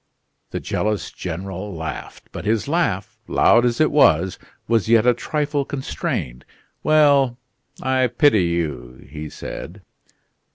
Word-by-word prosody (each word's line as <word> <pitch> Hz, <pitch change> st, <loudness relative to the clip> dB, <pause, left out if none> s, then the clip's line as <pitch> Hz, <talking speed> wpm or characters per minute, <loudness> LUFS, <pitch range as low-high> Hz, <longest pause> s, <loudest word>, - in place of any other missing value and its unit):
The -, -, -4 dB
jealous 105 Hz, -1 st, -2 dB
General 95 Hz, +2 st, -6 dB
laughed; 80 Hz, -1 st, -7 dB
but -, -, -7 dB
his 110 Hz, +1 st, 0 dB
laugh, 115 Hz, -, -1 dB
loud 120 Hz, +1 st, +4 dB
as 120 Hz, -1 st, 0 dB
it 155 Hz, -, +3 dB
was, 95 Hz, -, +3 dB, 0.3 s
was 115 Hz, -2 st, +1 dB
yet 115 Hz, -1 st, +5 dB
a 125 Hz, -, +5 dB
trifle 145 Hz, +3 st, -1 dB
constrained. 130 Hz, -, -4 dB, 0.4 s
"Well, 140 Hz, -5 st, +4 dB, 0.5 s
I 130 Hz, -1 st, +2 dB
pity 120 Hz, -, +3 dB
you," 75 Hz, -8 st, -3 dB
he 75 Hz, +2 st, -7 dB
said. 95 Hz, +6 st, -8 dB
110 Hz, 125 wpm, -21 LUFS, 85-135 Hz, 0.5 s, yet